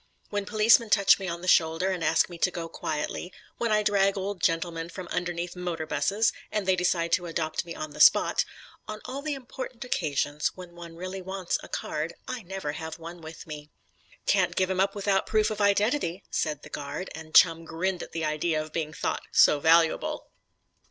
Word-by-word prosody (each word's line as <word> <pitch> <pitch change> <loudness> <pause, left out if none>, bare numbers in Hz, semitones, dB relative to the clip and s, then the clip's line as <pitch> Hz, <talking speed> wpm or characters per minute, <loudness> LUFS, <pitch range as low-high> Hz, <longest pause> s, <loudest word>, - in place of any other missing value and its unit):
When 205 -1 -2
policemen 220 +1 +5
touch 200 -1 +5
me 190 - -4
on 170 -1 -4
the - - -5
shoulder 165 +2 +3
and 180 -3 -3
ask 165 - +3
me 175 -2 -10
to 185 - +3
go 170 -2 -5
quietly; 160 +2 -4 0.3
when 235 -2 0
I 210 0 +3
drag 200 -1 +2
old 195 0 -4
gentlemen 165 -1 0
from 185 0 -8
underneath 175 0 -3
motor 175 -3 -3
'buses, 205 +7 +1 0.2
and 210 -3 -2
they 190 - +4
decide 175 -2 0
to 180 0 +1
adopt 160 -1 -2
me 170 - -7
on 155 -1 -5
the - - -11
spot; - - +6 0.4
on 215 0 -6
all 265 +2 -5
the 295 0 -2
important 260 -1 -7
occasions 150 - -1
when 180 -2 -10
one 170 -1 -10
really 185 +2 -6
wants 190 -1 -2
a - - -11
card, 155 +3 -3
I 255 -1 -4
never 190 -5 -4
have 160 +1 -6
one 170 +1 -9
with 160 0 -10
me. 150 -1 -8 0.6
"Can't - - +2
give 190 0 +1
him 185 - -1
up 195 +1 +2
without 200 -1 +1
proof 215 0 +2
of 210 -1 -3
identity," 205 - +1
said 150 -2 -1
the - - -11
guard, 145 +6 -5
and 160 0 -9
Chum 165 -1 +6
grinned 175 +3 -2
at - - -8
the 165 -1 -2
idea 155 +1 0
of 155 0 -6
being 155 -2 -2
thought - - -2
so 150 - +6
valuable. 165 +2 +2
175 Hz, 200 wpm, -27 LUFS, 165-200 Hz, 0.6 s, spot